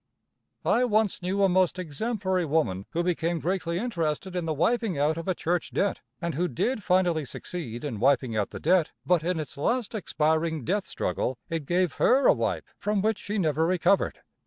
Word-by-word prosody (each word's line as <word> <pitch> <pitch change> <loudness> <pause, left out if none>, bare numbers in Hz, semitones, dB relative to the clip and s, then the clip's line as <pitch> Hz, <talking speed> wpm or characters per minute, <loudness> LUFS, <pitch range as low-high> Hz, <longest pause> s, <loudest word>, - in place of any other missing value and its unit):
I 245 - +3
once 215 -5 +1
knew 190 +3 0
a - - +6
most 185 -1 +2
exemplary 185 - -1
woman 140 - 0
who 170 - -1
became 170 -1 0
greatly 175 0 -1
interested 180 -4 -2
in 175 -2 -1
the 160 - 0
wiping 220 - +1
out 150 +3 +2
of 165 +2 -6
a 185 - +1
church 175 +1 -1
debt, 200 - 0 0.2
and 170 -3 -2
who 175 +6 0
did 215 - -1
finally 180 -4 +2
succeed 130 -4 -6
in 130 -8 -4
wiping 130 -2 +2
out 105 -2 0
the - - -7
debt, 180 -4 +2
but 180 -2 +3
in 175 0 0
its 150 -3 -6
last 235 - 0
expiring 160 - 0
death 195 0 0
struggle 130 - -2
it 160 -4 -3
gave 180 -2 +1
her 265 +3 +5
a - - +7
wipe - - -2
from 205 -1 0
which 220 -1 +1
she 210 +2 -4
never 160 -3 +1
recovered. 185 +2 +2
175 Hz, 190 wpm, -27 LUFS, 155-195 Hz, 0.2 s, a